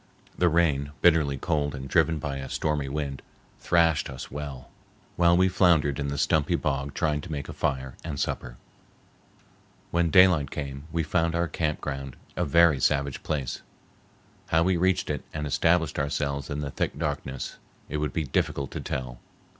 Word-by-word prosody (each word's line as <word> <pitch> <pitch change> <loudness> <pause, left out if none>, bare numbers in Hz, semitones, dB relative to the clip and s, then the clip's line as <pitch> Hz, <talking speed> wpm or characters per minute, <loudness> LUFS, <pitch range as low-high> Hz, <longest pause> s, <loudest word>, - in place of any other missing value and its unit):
The 90 - +3
rain, 75 -4 +1
bitterly 80 -5 +4
cold 75 -1 -1
and 65 0 -6
driven 80 +3 +3
by 70 -2 -4
a 65 0 -6
stormy 75 -3 -1
wind, 70 -1 -3 0.4
thrashed 85 -4 +2
us 65 -2 -8
well 70 -3 -7 0.4
while 85 0 +4
we 95 +1 +5
floundered 85 -6 +3
in 70 - -1
the 70 0 -3
stumpy - - +2
bog 70 +1 -2
trying 75 -3 0
to - - -9
make 70 -2 -4
a - - -7
fire 65 -1 -2
and 75 -4 -4
supper. - - -3 1.3
When 85 0 +2
daylight 85 -4 +5
came 70 -1 -5
we 85 +1 0
found 85 +1 +1
our 85 0 +1
camp 75 0 -2
ground 70 -3 -5 0.2
a - - 0
very 85 -1 +5
savage 70 -1 +1
place. 70 -5 -3 0.9
How 80 +1 +3
we 95 +1 +2
reached 95 0 +1
it 75 - -3
and 75 -1 -2
established 80 +2 +2
ourselves 70 -1 -2
in 75 +1 -3
the 70 -2 -4
thick 70 - -2
darkness 75 -4 -4 0.3
it 75 - -3
would 75 -2 -1
be 80 - -1
difficult 70 0 -1
to - - -4
tell. 60 -2 -4
75 Hz, 170 wpm, -27 LUFS, 70-85 Hz, 1.3 s, we